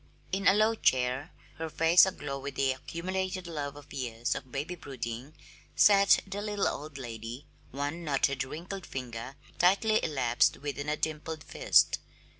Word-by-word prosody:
In 195 Hz, +1 st, 0 dB
a 190 Hz, -, +7 dB
low 215 Hz, +2 st, +4 dB
chair, 130 Hz, -, +1 dB, 0.3 s
her 160 Hz, 0 st, -4 dB
face 165 Hz, +4 st, +6 dB
aglow 145 Hz, -7 st, -4 dB
with 140 Hz, 0 st, -6 dB
the 135 Hz, -1 st, +2 dB
accumulated 185 Hz, +6 st, -3 dB
love 145 Hz, -4 st, -4 dB
of 145 Hz, -1 st, -13 dB
years 120 Hz, -3 st, -2 dB
of 130 Hz, -2 st, -7 dB
baby 145 Hz, +7 st, -3 dB
brooding, 135 Hz, -3 st, -6 dB, 0.4 s
sat 200 Hz, -1 st, +6 dB
the 200 Hz, +1 st, -5 dB
little 205 Hz, -1 st, 0 dB
old 150 Hz, -1 st, -5 dB
lady, 120 Hz, +1 st, -7 dB, 0.2 s
one 145 Hz, +5 st, -4 dB
knotted, 140 Hz, -3 st, +1 dB
wrinkled 175 Hz, +7 st, -7 dB
finger 125 Hz, 0 st, -6 dB, 0.2 s
tightly 200 Hz, +5 st, +4 dB
elapsed 125 Hz, -6 st, +2 dB
within 145 Hz, +1 st, -4 dB
a 150 Hz, -, 0 dB
dimpled 155 Hz, 0 st, -3 dB
fist. -, -, +3 dB
145 Hz, 150 wpm, -30 LUFS, 130-180 Hz, 0.4 s, a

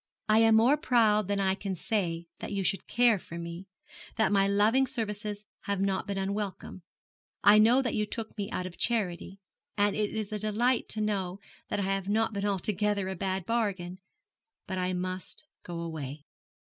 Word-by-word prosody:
I 215 Hz, +1 st, +5 dB
am 225 Hz, 0 st, +6 dB
more 240 Hz, +7 st, +5 dB
proud 220 Hz, -7 st, +3 dB
than 200 Hz, 0 st, 0 dB
I 190 Hz, -1 st, +2 dB
can 195 Hz, -1 st, -4 dB
say 170 Hz, -4 st, -1 dB
that -, -, -6 dB
you 200 Hz, -1 st, -1 dB
should 195 Hz, -, 0 dB
care 235 Hz, -4 st, +4 dB
for 170 Hz, -, -9 dB
me 170 Hz, +2 st, -7 dB, 0.5 s
that 220 Hz, -4 st, +2 dB
my 195 Hz, -1 st, +4 dB
loving 215 Hz, +7 st, +3 dB
services 210 Hz, -4 st, -4 dB, 0.2 s
have 200 Hz, -1 st, -1 dB
not 195 Hz, -1 st, 0 dB
been 200 Hz, -1 st, -2 dB
unwelcome. 195 Hz, -1 st, -3 dB, 0.6 s
I 205 Hz, +2 st, +8 dB
know 240 Hz, +5 st, +5 dB
that 245 Hz, -, -1 dB
you 210 Hz, -1 st, 0 dB
took 220 Hz, +1 st, -6 dB
me 205 Hz, -2 st, -3 dB
out 185 Hz, -, -3 dB
of 180 Hz, -1 st, -8 dB
charity; 195 Hz, -5 st, -1 dB, 0.4 s
and 205 Hz, 0 st, +2 dB
it 210 Hz, -1 st, 0 dB
is 215 Hz, -2 st, -4 dB
a 210 Hz, -, -2 dB
delight 225 Hz, +4 st, +1 dB
to 215 Hz, -, -2 dB
know 195 Hz, -3 st, -1 dB, 0.3 s
that -, -, -2 dB
I -, -, 0 dB
have 195 Hz, 0 st, -1 dB
not 220 Hz, +1 st, +1 dB
been 200 Hz, 0 st, -1 dB
altogether 200 Hz, 0 st, 0 dB
a 190 Hz, -, -3 dB
bad 190 Hz, 0 st, -2 dB
bargain. 195 Hz, -6 st, -1 dB, 0.7 s
But 185 Hz, -1 st, -3 dB
I 180 Hz, 0 st, 0 dB
must 185 Hz, +9 st, -5 dB, 0.2 s
go 170 Hz, -1 st, -6 dB
away.' 150 Hz, -4 st, -6 dB
200 Hz, 185 wpm, -29 LUFS, 185-215 Hz, 0.7 s, I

